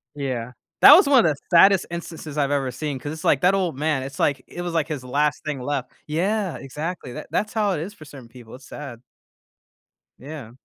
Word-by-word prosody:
Yeah, 125 -4 -4 0.3
that 295 - +11
was 375 -4 +5
one 265 -8 +5
of 155 - +4
the - - -3 0.2
saddest 195 +2 +6
instances 160 -3 -7
I've 140 -1 +1
ever 135 -3 0
seen, 150 -1 -4
'cause 145 - -6
it's, 160 - -9
like, 135 - +3
that 180 +2 +4
old 180 -8 -1
man, 150 -3 0
it's, 135 0 -8
like, 145 - +1
it 175 - -7
was, 175 -1 -4
like, 160 -2 0
his 145 -5 -5
last 145 +2 0
thing 150 -3 -3
left. 135 -1 -3 0.2
Yeah, 190 +5 -1
exactly, 150 -1 -6
tha - - -7
that's 215 +1 -1
how 210 -3 +1
it 150 - -2
is 200 +5 -6
for 155 - -14
certain 135 -5 -12
people, 120 -1 -13
it's 130 +1 -15
sad. 125 -6 -9 1.2
Yeah. 140 -5 -9
150 Hz, 220 wpm, -23 LUFS, 135-175 Hz, 1.2 s, that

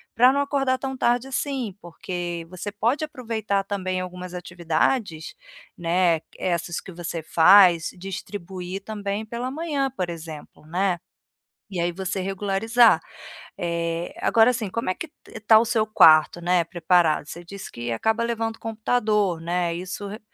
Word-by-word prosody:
para 250 +3 +6
não 280 - +1
acordar 275 -2 +1
tão 265 0 -4
tarde 245 0 +1
assim, 260 -6 -3
porque 175 0 -5
você 185 +4 -6
pode 235 +9 0
aproveitar 225 -9 -2
também 185 -2 -2
algumas 180 0 -7
atividades, 175 +1 -1 0.4
né, 170 -1 +2 0.2
essas 170 -1 -2
que - - -11
você 170 -1 -5
faz, 175 0 +6
distribuir 190 0 -6
também 205 0 -4
pela 235 +3 -4
manhã, 285 -2 -1
por 185 -9 -4
exemplo, 155 -2 -10
né, 180 +1 0 0.7
e 190 -3 -5
aí 170 +1 +1
você 190 +1 -3
regularizar. 205 +5 +3 0.6
É, 170 0 -2
agora 225 +1 +5
assim, 230 -5 -1
como 230 +1 -2
é 185 - +2
que 335 - -7
t 300 - -36 0.2
está 215 +1 +6
o - - +3
seu 220 -2 +1
quarto, 160 -4 +6
né, 175 -1 +2
preparado? 170 -2 +2
Você 170 +3 -8
disse 200 +3 -9
que 120 0 -5
acaba 220 - 0
levando 225 -1 -2
o - - -37
computador, 215 -5 0
né, 170 +1 -1
isso 185 +3 -5
re 210 - -7
190 Hz, 155 wpm, -24 LUFS, 175-225 Hz, 0.7 s, para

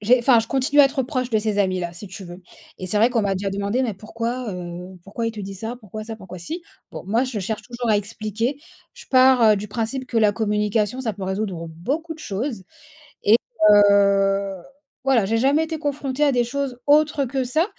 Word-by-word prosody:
j'ai 240 +5 +4
enfin, 240 -1 +5
je 225 - -7
continue 275 +2 +3
à - - +9
être 270 0 -1
proche 255 -1 -3
de 220 - +2
ces 210 -1 -1
amis-là, 185 -3 -1
si 185 +4 -10
tu 190 +1 -9
veux. 175 +1 -11 0.4
Et 185 - -5
c'est 210 - 0
vrai 220 +3 +5
qu'on 230 -3 +1
m'a 200 -1 0
déjà 195 +1 -2
demandé, 200 +6 -1
mais 225 -4 -2
pourquoi, 230 +4 -4
heu, 180 +1 -7
pourquoi 230 +4 -4
il - - -5
te 220 - -11
dit 195 0 -6
ça? 225 +5 -5
Pourquoi 215 0 -8
ça? 225 0 -7
pourquoi 185 -3 -10
si? 320 - -5 0.3
Bon, - - -7
moi, 225 +5 +2
je 255 -4 -4
cherche 210 +3 -3
toujours 240 -1 -5
à 210 - +4
expliquer. 215 +5 -3 0.4
Je 480 0 -13
pars, 255 -1 +5
heu, - - +2
du 205 +1 -5
principe 230 +5 -3
que 235 - -3
la 210 -2 +4
communication, 210 +2 0
ça 230 -4 -2
peut 195 - -10
résoudre 190 -3 -3
beaucoup 280 - -4
de - - -16
choses 225 -4 -4 0.6
et 220 +3 +6 0.3
heu, 200 -1 +4 0.5
voilà, 255 -6 +3
j'ai 225 +3 +1
jamais 280 +6 +3
été 320 0 -4
confrontée 285 -1 -2
à 285 - +4
des 245 -1 +3
choses 255 0 -3
autres 295 -1 +4
que 265 +1 -2
ça. 310 +7 +1
225 Hz, 225 wpm, -22 LUFS, 200-255 Hz, 0.6 s, à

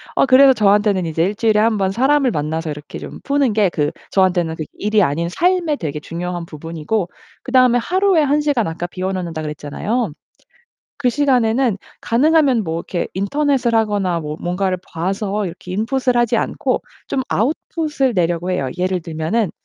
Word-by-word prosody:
어 - - +4
그래서 265 +1 +7
저한테는 205 -4 +2
이제 160 0 0
1 205 +3 -2
주일에 220 -1 +2
1 220 0 +2
번 190 -1 +1
사람을 265 +4 +2
만나서 155 +2 -2
이렇게 150 0 -8
좀 - - -9
푸는 280 -5 +1
게 205 -3 +3
그 150 -3 -1 0.2
저한테는 175 -4 +2
그 155 - -5
일이 210 +1 +1
아닌 170 +3 0
삶의 345 - +1
되게 150 - -4
중요한 175 +2 -5
부분이고 165 +5 -3 0.3
그다음에 255 -2 +4
하루에 370 +6 +2
1 295 +1 +2
시간 280 - +1
아까 165 +2 -4
비워 185 +2 -3
놓는다고 170 -4 -4
그랬잖아요. 155 - -3 0.9
그 270 -3 +1
시간에는 250 -4 +2 0.2
가능하면 275 -2 +3
뭐 165 -1 -2
이렇게 170 +1 -3
인터넷을 245 +4 +1
하거나 205 -5 +1
뭐 150 -1 -5
뭔가를 185 +1 -1
봐서 195 +4 -2
이렇게 180 0 -7
인풋을 245 +5 0
하지 240 -1 +2
않고 - - -1 0.3
좀 265 - -1
아웃풋을 280 - -1
내려고 175 0 0
해요. 160 -8 -1
예를 185 0 0
들면은 165 +6 -1
205 Hz, 370 characters per minute, -19 LUFS, 170-255 Hz, 0.9 s, 그래서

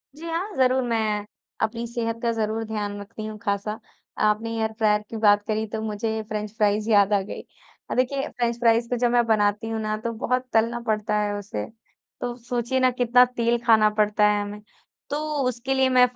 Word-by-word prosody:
जी 320 - -10
हाँ, 345 +6 -2
ज़रूर 260 0 +3
मैं, 215 -3 0 0.4
अपनी 230 +2 -1
सेहत 230 -1 -3
का 235 - +2
ज़रूर 220 0 -1
ध्यान 205 -2 -4
रखती 215 +2 -8
हूँ 215 0 -6
खासा। 210 +1 -2 0.4
आपने 215 +2 +2
एयर 220 0 0
फ्रायर 210 -2 +3
की 225 - -5
बात 205 -1 +5
करी 220 0 0
तो 220 +1 -4
मुझे 220 +1 -2
फ्रेंच 210 -1 -3
फ्राइज़ 210 0 +1
याद 205 -1 +5
आ 200 - +3
गई। 195 - -7 0.5
अ, - - -1
देखिए 270 +3 0
फ़्रेंच-फ़्राइज़ 235 -1 +1
को 245 - 0
जब 240 0 +2
मैं 240 -1 +3
बनाती 210 0 +2
हूँ 225 0 -2
ना 215 0 -1
तो 235 - -1
बहुत 255 0 +1
तलना 230 +2 +2
पड़ता 215 0 0
है 205 0 0
उसे। 195 - -5 0.6
तो 245 -1 -3
सोचिए 240 +1 -2
ना 255 0 +4
कितना 245 0 +5
तेल 240 -1 0
खाना 220 -2 +6
पड़ता 210 0 +2
है 205 0 +1
हमें। 205 +1 -6 0.5
तो 290 - -1 0.3
उसके 250 +2 -3
लिए 265 0 +3
मैं 250 -1 +6
225 Hz, 195 wpm, -24 LUFS, 210-240 Hz, 0.6 s, खाना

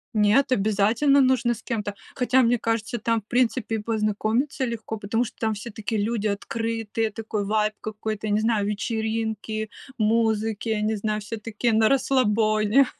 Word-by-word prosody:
Нет, 215 +6 +4
обязательно 220 +6 +3
нужно 250 -2 +2
с 230 - -13
кем-то. 210 -4 -3 0.2
Хотя, 255 +1 +3
мне 235 0 +3
кажется, 225 0 -1
там, 230 0 0
в - - -38
принципе, 240 -2 +1
и - - 0
познакомиться 220 +5 0
легко, 225 -2 -3
потому 215 +4 0
что - - -8
там 220 -1 0
все 210 +3 -7
такие 215 0 -3
люди 215 -1 -1
открытые, 225 +1 -2
такой 215 -1 -3
вайб 215 +1 +1
какой-то, 215 0 -4
не 205 +1 +2
знаю, 220 -2 +1
вечеринки, 220 0 -2 0.3
музыки, 220 0 +1
не 220 +1 +1
знаю, 215 +1 -1
все 225 +2 -5
такие 225 +2 -1
на 220 0 +4
расслабоне. 225 -2 +3
220 Hz, 155 wpm, -25 LUFS, 210-230 Hz, 0.3 s, Нет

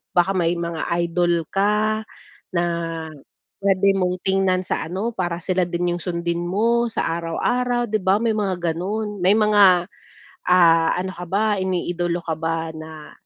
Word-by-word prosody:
baka 175 +2 +3
may 175 -2 +1
mga 170 -1 -3 0.2
idol 170 -1 +1
ka 210 +2 +1 0.5
na 170 - +2 1.0
puwede 195 0 +3
mong 180 -2 0
tingnan 190 -1 +2
sa 180 - -3
ano, 195 +7 -3
para 175 -4 -2
sila 185 -2 0
din 175 0 -1
yung 175 - -7
sundin 170 -1 -2
mo 235 +5 +1
sa 215 - -2
araw-araw, 240 +8 0
di 215 - +1
ba 190 +2 +3
may 230 -1 +1
mga 185 -5 -1
ganun. 205 +4 -4
May 190 +4 +4
mga, 200 -5 +5 0.6
ah, 165 -2 +5
ano 185 +1 -3
ka 180 - -7
ba, 205 +3 +1
iniidolo 175 -2 -1
ka 160 -2 -2
ba 165 0 -2
na, 155 -1 -10
180 Hz, 155 wpm, -22 LUFS, 170-205 Hz, 1.0 s, mga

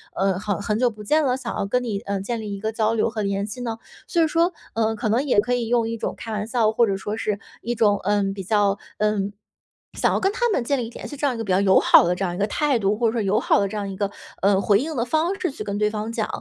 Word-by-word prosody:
呃， 190 -1 +1
很 205 0 -2
很 210 +1 -1
久 250 0 +3
不 215 -2 -10
见 305 +9 +2
了， 255 -2 +2
想 - - -5
要 205 - -1
跟 250 +5 0
你， 210 -4 -2
嗯， 200 -1 -2
建 235 +2 -3
立 210 -2 -5
一 200 - -5
个 220 +1 -2
交 220 0 +1
流 225 0 +1
和 220 -1 -4
联 200 0 -1
系 215 +4 -7
呢？ 230 -2 -3 0.3
所 340 - +1
以 - - +3
说， 335 +3 +2 0.2
嗯， 225 0 +1
可 220 0 -2
能 240 +6 +2
也 260 -7 +3
可 245 +4 +1
以 240 -2 0
用 235 -1 +2
一 230 - -3
种 - - -3
开 225 - -7
玩 210 -1 -2
笑， 230 -3 +2
或 235 +1 +3
者 195 -1 0
说 210 +2 -4
是 210 -2 -2 0.2
一 240 +1 -2
种， 205 -3 +3
嗯， 200 0 +1
比 195 - -6
较， 205 0 +2 0.2
嗯， 210 -1 0 0.6
想 - - +1
要 - - +1
跟 385 - +1
他 480 +3 0
们 265 - +1
建 280 +4 0
立 230 -2 -3
联 - - -8
系 290 - -8
这 290 - -1
样 270 - +2
一 - - -6
个 225 - -3
比 195 - -3
较 185 - +4
友 190 -1 +5
好 - - +6
的 175 - +2
这 195 - -3
样 175 -2 -1
一 - - -6
个 200 - +1
态 290 +2 +1
度， 205 0 +1
或 235 - +2
者 220 - 0
说 230 - 0
友 200 +2 +2
好 - - +3
的 200 - +1
这 195 - -7
样 200 -1 -3
一 195 - -6
个， 200 0 -1 0.3
嗯， 195 0 +3
回 200 -1 +4
应 310 +3 -3
的 235 - 0
方 320 +9 0
式 355 - -1
去 - - -7
跟 200 0 -3
对 210 0 +2
方 215 +1 -4
讲。 225 -2 -1
215 Hz, 335 characters per minute, -23 LUFS, 200-240 Hz, 0.6 s, 好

